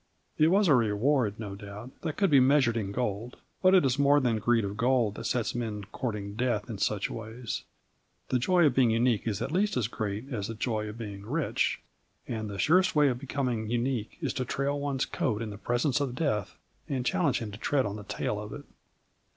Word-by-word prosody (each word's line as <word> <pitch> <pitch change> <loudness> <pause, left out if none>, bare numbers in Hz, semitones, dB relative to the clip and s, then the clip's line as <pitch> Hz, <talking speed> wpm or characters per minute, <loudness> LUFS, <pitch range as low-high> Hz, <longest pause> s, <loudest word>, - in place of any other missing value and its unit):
It 155 - +6
was 195 +3 +4
a 155 - +6
reward, 115 0 +2
no 105 -3 -5
doubt, 100 +4 -9
that 155 -3 -3
could 195 -4 +2
be 140 - +7
measured 130 -2 +4
in 100 -4 -2
gold. 115 +1 -3 0.2
But 185 0 +6
it 180 - +5
is 135 +1 +1
more 140 +1 +5
than 120 -5 +1
greed 115 0 +2
of 100 +1 -4
gold 120 -2 +2
that - - -7
sets 120 -3 0
men 110 -4 -3
courting 105 -5 -4
death 115 -1 -1
in 105 - -6
such 105 0 0
ways. 115 +1 -5 0.6
The 130 - +2
joy 175 +6 +4
of 145 - +4
being 125 -2 +4
unique 115 0 +2
is 105 -3 -1
at - - -3
least 195 -1 +1
as 115 -3 +1
great 110 +4 -4
as 100 -4 -2
the 115 - -5
joy 110 -2 -2
of 105 - -8
being 100 -4 -7
rich. 145 +7 0 0.5
And 110 -3 -3
the 100 - -6
surest 185 - +3
way 150 -2 +5
of 125 -1 -2
becoming 125 -5 -2
unique 120 -1 -1
is 140 -6 -1
to 130 - -1
trail 140 +3 -1
one's 140 -2 -1
coat 110 -5 -1
in 115 -2 -4
the 100 - -8
presence 120 +6 +1
of 130 -3 -2
Death 125 - -1 0.3
and 130 -3 -1
challenge 175 -3 +2
him 110 -3 -5
to 105 - -9
tread 140 -1 +1
on 100 0 -3
the 105 - -8
tail 105 0 -3
of 105 +3 -7
it. 145 0 -8
120 Hz, 220 wpm, -29 LUFS, 105-140 Hz, 0.6 s, be